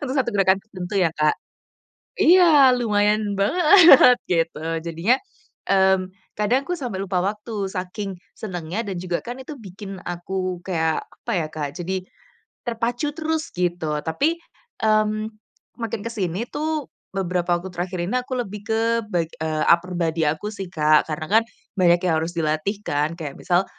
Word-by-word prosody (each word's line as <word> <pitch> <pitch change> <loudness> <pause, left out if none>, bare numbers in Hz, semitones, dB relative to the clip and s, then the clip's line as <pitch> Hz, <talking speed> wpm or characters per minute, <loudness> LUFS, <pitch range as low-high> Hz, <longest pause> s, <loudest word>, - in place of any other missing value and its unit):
untuk 275 -2 -3
satu 255 -3 +1
gerakan 195 -1 +4
tertentu 185 -3 -7
ya, 175 -5 +2
Kak. 155 -1 +2 0.8
Iya, 360 +2 +7 0.3
lumayan 210 -3 +2 0.2
banget 315 - +7
gitu 165 -3 0 0.3
jadinya, 170 +9 +2 0.5
mmm, 190 -1 +3 0.2
kadang 210 +5 +2
aku 355 - -1
sampai 245 - -4
lupa 190 -1 -1
waktu 210 +3 -4 0.2
saking 190 +2 -4 0.3
senengnya 180 +1 -4
dan 195 -3 -4
juga 180 -1 -3
kan 245 +2 -6
itu 290 +3 -8
bikin 195 -3 -9
aku 180 +1 -3
kayak 160 -4 0
apa 235 - -7
ya, 160 - -2
Kak, 155 -2 -4
jadi 185 +1 -3 0.6
terpacu 240 +4 -2
terus 320 -1 -2
gitu 175 -4 -1
tapi, 285 - +1 0.5
mmm, 215 0 +2 0.6
makin 230 -1 -3
ke 230 - -3
sini 190 0 -2
tuh 310 -1 -2 0.2
beberapa 180 -2 0
waktu 180 +1 -8
terakhir 180 +1 -3
ini 190 - -4
aku 250 - -7
lebih 210 -4 -4
ke 220 - +2 0.3
ba 175 -5 +1 0.4
upper 180 +1 +3
body 165 -1 0
aku 205 +8 -4
sih, 195 -3 -6
Kak. 155 -2 +3
Karena 155 0 -3
kan - - -5 0.3
banyak 175 -3 +4
yang 160 -3 +2
harus 165 +2 -3
dilatih 155 +5 0
kan. 150 +3 -1
Kayak 150 -5 -5
misal 180 +1 +2
190 Hz, 155 wpm, -23 LUFS, 175-230 Hz, 0.8 s, Iya